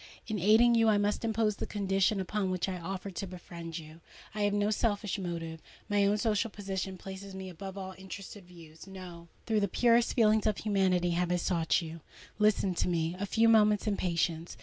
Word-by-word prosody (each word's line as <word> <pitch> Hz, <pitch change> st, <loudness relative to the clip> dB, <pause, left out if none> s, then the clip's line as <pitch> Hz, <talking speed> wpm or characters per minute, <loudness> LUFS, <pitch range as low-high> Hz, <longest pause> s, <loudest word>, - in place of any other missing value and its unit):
In 215 Hz, -2 st, -3 dB
aiding 220 Hz, +6 st, +5 dB
you, 225 Hz, -1 st, +4 dB
I 210 Hz, -, +4 dB
must 205 Hz, +2 st, 0 dB
impose 220 Hz, -2 st, +1 dB
the -, -, -4 dB
conditions 195 Hz, 0 st, +1 dB
upon 195 Hz, +1 st, -1 dB
which 185 Hz, 0 st, -1 dB
I 185 Hz, -1 st, -3 dB
offer 190 Hz, +3 st, -5 dB
to 190 Hz, +2 st, -5 dB
befriend 170 Hz, -2 st, -8 dB
you! 160 Hz, 0 st, -11 dB, 0.3 s
I 210 Hz, -, -3 dB
have 205 Hz, 0 st, +2 dB
no 205 Hz, +1 st, +1 dB
selfish 210 Hz, -2 st, 0 dB
motive:—my 175 Hz, +4 st, -2 dB
own 205 Hz, +1 st, +2 dB
social 220 Hz, +1 st, +1 dB
position 195 Hz, -2 st, -4 dB
places 195 Hz, +1 st, -8 dB
me 190 Hz, 0 st, -6 dB
above 190 Hz, +2 st, -8 dB
all 190 Hz, -1 st, -6 dB
interested 190 Hz, +1 st, -9 dB
views. 165 Hz, -1 st, -14 dB
No:—through 185 Hz, +3 st, -5 dB
the 200 Hz, -, +1 dB
purest 235 Hz, +4 st, +3 dB
feelings 220 Hz, -2 st, +4 dB
of 215 Hz, -, +1 dB
humanity 190 Hz, -4 st, +1 dB
have 175 Hz, +1 st, 0 dB
I -, -, +3 dB
sought 170 Hz, -1 st, +1 dB
you. 165 Hz, 0 st, -8 dB, 0.4 s
Listen 210 Hz, -3 st, +3 dB
to 175 Hz, -, -1 dB
me 170 Hz, -1 st, 0 dB
a 200 Hz, -, -2 dB
few 225 Hz, +3 st, +3 dB
moments 210 Hz, -2 st, +4 dB
in 210 Hz, -2 st, +1 dB
patience. 170 Hz, -2 st, -1 dB
195 Hz, 195 wpm, -30 LUFS, 175-210 Hz, 0.4 s, aiding